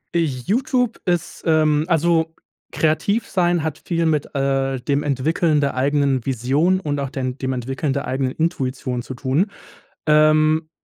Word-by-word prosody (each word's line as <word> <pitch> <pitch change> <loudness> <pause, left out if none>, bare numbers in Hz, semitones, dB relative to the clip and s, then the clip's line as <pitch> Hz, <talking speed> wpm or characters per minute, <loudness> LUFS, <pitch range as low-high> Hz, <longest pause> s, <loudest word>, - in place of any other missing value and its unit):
YouTube 220 - 0
ist 175 -2 -2
ähm, 155 -1 +3
also, 165 -1 +2 0.4
kreativ 200 +8 +1
sein 175 -4 +1
hat 160 -2 -4
viel, 170 -1 0
mit, 150 -3 0
äh, 135 -1 0
dem 140 +3 0
Entwickeln 150 +3 +1
der 140 -1 0
eigenen 140 -1 +1
Vision 140 +9 +1
und 145 -5 -2
auch 135 -1 -2
den 130 -2 -3
dem 130 -1 -2
Entwickeln 135 +3 -2
der 140 - -2
eigenen 130 -1 -1
Intuition 130 -6 -2
zu 130 - -8
tun. 140 - 0 0.6
Ähm, 155 +1 +4
150 Hz, 145 wpm, -21 LUFS, 135-165 Hz, 0.6 s, Ähm